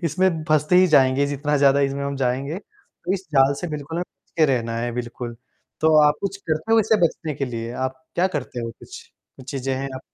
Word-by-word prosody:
इसमें 165 0 +1
फँसते 155 +3 +3
ही 185 - +7
जाएँगे 140 -3 +4
जितना 145 +1 -1
ज़्यादा 140 0 +4
इसमें 140 0 0
हम 140 0 -3
जाएँगे, 135 +7 -1 0.5
इस 190 -1 -6
जाल 135 +1 +5
से 175 - -3
बिल्कुल 150 +2 -5
हमें - - 0
बच - - -45
के 155 - +6
रहना 115 -1 -2
है, 120 +1 -2
बिल्कुल। 120 0 -5 0.4
तो 160 0 +4
आप 150 - +4
कुछ 195 0 -3
करते 160 +2 -2
हो 225 - +6
इसे 220 +1 +3
बचने 155 -2 -5
के 140 - -2
लिए? 115 -1 -5
आप 130 0 -4
क्या 180 +2 +3
करते 125 -3 -5
हो 115 0 -4
कुछ - - -12 0.5
चीज़ें 135 0 -2
हैं 135 +1 -3
आप? 130 - -6
140 Hz, 215 wpm, -22 LUFS, 130-160 Hz, 0.5 s, ही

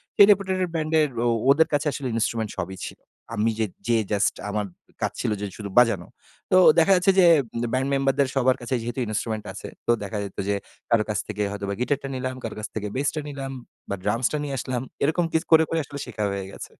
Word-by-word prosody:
সেই 200 - +9
রেপুটেডেট 190 -2 +1
ব্যান্ডের 155 -1 +2 0.2
ও 120 - +3 0.2
ওদের 160 +3 +6
কাছে 145 +1 +1
আসলে 135 -2 -4
ইনস্ট্রুমেন্ট 110 -1 0
সবই 95 0 -4
ছিল। - - -11 0.4
আমি 110 +2 +2
যে 110 - +2 0.2
যেয়ে 115 -2 +3
জাস্ট 100 0 +2
আমার 105 0 -1 0.4
কাজ - - 0
ছিল - - 0
যে - - -1
শুরু 105 -2 -6
বাজানো। 115 -8 +4 0.4
তো, 185 - +6 0.2
দেখা 165 +4 +4
যাচ্ছে 180 +2 +4
যে, 180 - +7 0.5
ব্যান্ড 130 +2 +1
মেম্বারদের 135 0 +2
সবার 130 -1 +3
কাছে 120 +2 -2
যেহেতু 120 +3 -4
ইন্সট্রুমেন্ট 110 0 -3
আছে। - - -8 0.2
তো, - - +5
দেখা 100 +1 -4
যেত 100 - -8
যে, 100 - +2 0.3
কারো 115 -2 +4
কাছ 105 - 0
থেকে 105 -1 -4
হয়তোবা 100 -1 -3
গিটারটা 140 +1 0
নিলাম। 130 0 -3
কারো 115 - -4
কাছ 105 - -4
থেকে 105 -1 -2
বেসটা 145 +3 0
নিলাম 135 -1 -5 0.4
বা 100 - -1
ড্রামসটা 120 +8 +1
নিয়ে 140 -2 -3
আসলাম। 125 -1 -2 0.2
এরকম 160 +4 +2
কিছু 160 +1 +1
করে, 160 0 +8
করে 165 - 0
আসলে 140 0 -8
শেখা 105 - -4
হয়ে 100 -1 -3
গেছে। - - -8
130 Hz, 205 wpm, -24 LUFS, 105-150 Hz, 0.5 s, সেই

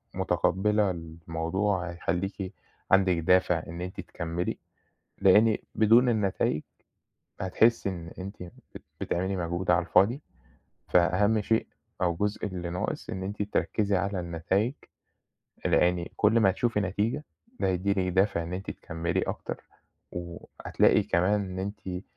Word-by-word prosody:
مُتقبَّلة 105 +1 +2
الموضوع، 85 +3 -2
هيخلّيكِ 95 +3 -3 0.4
عندِك 95 -2 +5
دافع 90 -1 +3
إن 85 +1 -7
أنتِ 90 +1 -6
تكمِّلي، 85 +1 -4 0.6
لإن 105 +3 +6 0.2
بدون 115 +3 +5
النتايج 100 -8 +1 0.8
هتحسّي 100 +3 +3
إن 85 -3 -7
أنتِ 100 +3 -6
بت 85 - -13 0.2
بتعملي 95 +3 -1
مجهود 85 +1 -1
على 90 0 +3
الفاضي. 100 - +3 0.7
فأهم 95 +5 +3
شيء 110 +2 +1 0.4
أو 85 -2 +3
الجزء 105 +4 -1
اللي 90 -3 -4
ناقص، 90 - -3
إن 95 - -4
أنتِ 100 +2 -3
تركِّزي 105 0 0
على 100 0 -1
النتايج، 90 +7 0 0.9
لإن 90 -1 +3
كل 110 +2 +4
ما 100 -4 +5
هتشوفي 110 +3 0
نتيجة، 105 +9 -1 0.4
ده - - +1
هيدّي 95 +1 0
لكِ 100 - 0 0.2
دافع 95 -2 +2
إن 85 +2 -6
أنتِ 95 +2 -4
تكمِّلي 85 +3 -3
أكتر - - -5 0.5
وهتلاقي 85 -1 0
كمان 100 +4 +2
إن 95 -1 -5
أنتِ 95 -2 -5
95 Hz, 125 wpm, -28 LUFS, 85-105 Hz, 0.9 s, لإن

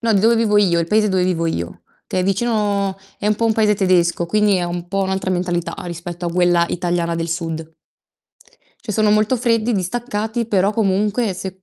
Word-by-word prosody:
No, 230 -1 +1
di 195 - +3
dove 230 +3 +4
vivo 220 -2 +2
io, 180 -5 +3
il 170 - 0
paese 210 +3 +2
dove 190 -2 +1
vivo 170 -2 0
io, 85 - -4 0.2
che 185 - -1
è - - 0
vicino 200 -1 0 0.2
è 205 - -3
un 210 - +3
po' 230 +2 0
un 225 - +3
paese 215 -1 +2
tedesco, 175 -3 +2
quindi 210 +2 +2
è 180 - -1
un 175 0 -4
po' 195 +1 -1
un'altra 190 0 -2
mentalità 175 -2 -1
rispetto 175 0 -6
a - - 0
quella 175 0 +3
italiana 175 -1 -1
del 165 0 -3
sud. 165 -1 -4 1.1
Cioè, 225 - -4
sono 215 +1 +2
molto 215 +4 +2
freddi, 230 -1 +1
distaccati, 220 +3 -2
però 200 -2 +2
comunque 210 +1 0
se 190 +1 -7
190 Hz, 200 wpm, -19 LUFS, 175-215 Hz, 1.1 s, dove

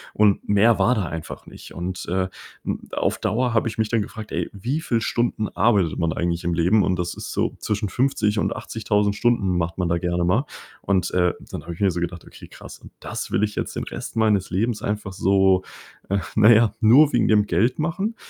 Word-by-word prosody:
und 105 -2 +2
mehr 105 +3 +4
war 125 +1 +3
da 100 -5 -1
einfach 80 -1 -7
nicht. - - -13
Und, 90 +2 -5
äh, 95 +1 0 0.4
hm, - - -4
auf - - -1
Dauer 120 +3 0
habe 115 0 +2
ich 110 - -5
mich 110 -1 0
dann 115 -2 +1
gefragt: 110 +1 -8
„Ey, - - -2
wie 125 +11 -3
viel 120 -7 0
Stunden 115 -1 -1
arbeitet 100 -7 +1
man 85 -1 +1
eigentlich 85 +1 -2
im 85 0 -1
Leben?“ 90 +6 +3
Und 90 -2 0
das 90 0 -2
ist - - -7
so - - -1
zwischen 105 0 -2
50 110 -4 0
und - - -1
80000 105 -2 -1
Stunden 100 -7 +1
macht 85 0 -3
man 90 -2 -1
da 85 0 +1
gerne 85 0 -1
mal. 110 +11 +2 0.4
Und, 95 -2 0
äh, 90 -1 +2
dann - - -8
habe 85 - -7
ich 85 - -13
mir 100 - +3
so 85 - -3
gedacht: 85 0 -4
„Okay - - -13
krass, - - -12
und - - -15
das - - -5
will 105 - 0
ich 105 - 0
jetzt - - -4
den - - -3
Rest - - -7
meines 105 -4 +2
Lebens 110 +4 -1
einfach 105 -1 -3
so, 95 0 +3 0.5
äh 100 - +1 0.2
na 110 +1 +7
ja, 110 -1 +5
nur 135 +7 +6
wegen 120 - +3
dem 105 -1 +4
Geld 115 +8 +1
machen?“ 190 +8 -2
105 Hz, 225 wpm, -23 LUFS, 90-115 Hz, 0.5 s, na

